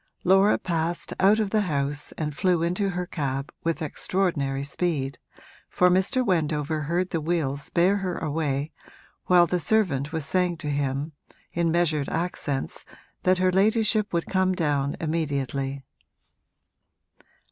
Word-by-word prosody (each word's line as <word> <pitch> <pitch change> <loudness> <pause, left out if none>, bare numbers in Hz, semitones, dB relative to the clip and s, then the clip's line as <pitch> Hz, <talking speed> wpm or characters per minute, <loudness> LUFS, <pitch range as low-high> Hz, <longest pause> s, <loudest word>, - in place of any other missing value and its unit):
Laura 195 +3 +5
passed 170 0 -2
out 200 +3 +5
of 210 -3 -1
the 215 - +3
house 145 -5 -2
and 150 -2 -4
flew 180 -1 +2
into 180 +4 0
her 180 -1 -3
cab 140 -4 -3
with 165 0 -1
extraordinary 145 -4 -1
speed, 140 -2 -2 0.5
for 180 0 +3
Mr. 195 +8 +2
Wendover 155 -4 0
heard 175 +5 -1
the 165 - -1
wheels 150 -4 -2
bear 185 +4 +3
her 185 -3 -3
away 150 -1 -2 0.6
while 175 -1 +6
the 180 +1 -1
servant 160 -8 +1
was 160 -3 -2
saying 180 +2 +1
to 150 -2 -4
him 140 +1 -1 0.4
in 170 -1 +1
measured 160 -4 +1
accents 155 -5 -2 0.4
that 185 0 +3
her 185 0 +2
ladyship 215 +2 +2
would 170 -1 0
come 185 -1 +1
down 145 -4 0
immediately. 140 -4 -2
165 Hz, 135 wpm, -25 LUFS, 145-185 Hz, 0.6 s, while